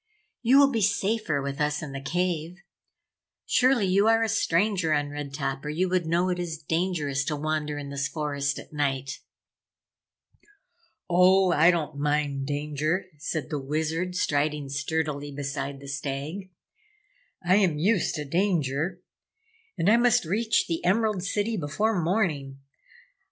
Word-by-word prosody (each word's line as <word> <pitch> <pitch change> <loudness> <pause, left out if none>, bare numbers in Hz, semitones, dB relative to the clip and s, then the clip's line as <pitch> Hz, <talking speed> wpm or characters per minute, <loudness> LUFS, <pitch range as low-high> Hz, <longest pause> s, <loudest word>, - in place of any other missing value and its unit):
"You 250 +3 +5
will 280 -1 +6
be 230 -4 0
safer 200 -6 0
with 140 +2 -4
us 150 +2 0
in 150 - -6
the 135 0 -6
cave. 175 +1 -2 0.9
Surely 255 -4 +3
you 195 +3 +3
are 225 0 +4
a 225 - 0
stranger 185 -4 +1
on 145 -1 0
Red 145 -1 -6
Top 135 -1 -3
or 150 - -4
you 175 +5 0
would 180 -2 0
know 175 +3 +1
it 180 -1 -1
is 170 -3 -3
dangerous 155 -3 -1
to 150 - -1
wander 150 0 -2
in 140 -1 -6
this 140 0 -1
forest 140 -2 -2
at - - -11
night." 135 -2 -2 1.9
"Oh, 185 +1 +5
I 165 +1 +5
don't 155 -4 -1
mind 145 -2 0
danger," 150 +5 -1
said 155 0 -4
the 150 - -1
Wizard, 160 +6 -2
striding 145 -3 0
sturdily 145 0 -2
beside 140 0 -4
the 140 - -11
Stag. 140 +7 -4 1.0
"I 185 +2 +5
am 185 -7 +2
used 190 +4 +1
to 150 - -4
danger 170 0 0 0.7
and 165 - 0
I 220 +3 +6
must 240 -6 +3
reach 220 +7 +1
the 165 -1 -3
Emerald 210 +1 +2
City 210 +3 -1
before 185 +6 0
morning! 155 -7 -1
160 Hz, 150 wpm, -26 LUFS, 145-185 Hz, 1.9 s, will